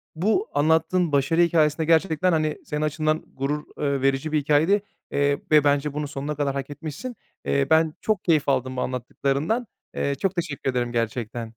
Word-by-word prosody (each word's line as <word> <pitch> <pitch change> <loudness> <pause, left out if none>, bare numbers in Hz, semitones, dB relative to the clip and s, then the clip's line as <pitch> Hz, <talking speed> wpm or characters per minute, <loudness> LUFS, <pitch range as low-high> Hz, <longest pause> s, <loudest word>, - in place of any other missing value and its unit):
bu 220 - +1
anlattığın 160 +3 +2
başarı 145 +4 +2
hikâyesi 155 -3 +3
de 160 - -1
gerçekten, 165 +2 +3
hani, 155 -2 0
senin 150 0 -3
açından 155 +1 0
gurur, 145 +3 -2
ııı, 140 -2 -1
verici 135 +3 +1
bir 155 - +2
hikâyeydi. 155 +8 +3 0.3
Eee, 140 0 +1
ve 150 -1 +6
bence 145 0 +1
bunu 150 0 -3
sonuna 145 +1 -4
kadar 140 -1 -1
hak 135 0 -4
etmişsin. 155 - -7 0.3
Eee, 140 -1 +1
ben 160 -1 +4
çok 215 -4 0
keyif 155 -5 +2
aldım 130 -1 0
bu 125 - 0
anlattıklarından. 140 - -1 0.3
Eee, 140 0 0
çok 195 +6 -1
teşekkür 155 -6 -2
ederim 120 -1 -1
gerçekten. 115 0 -3
150 Hz, 175 wpm, -24 LUFS, 140-160 Hz, 0.3 s, ve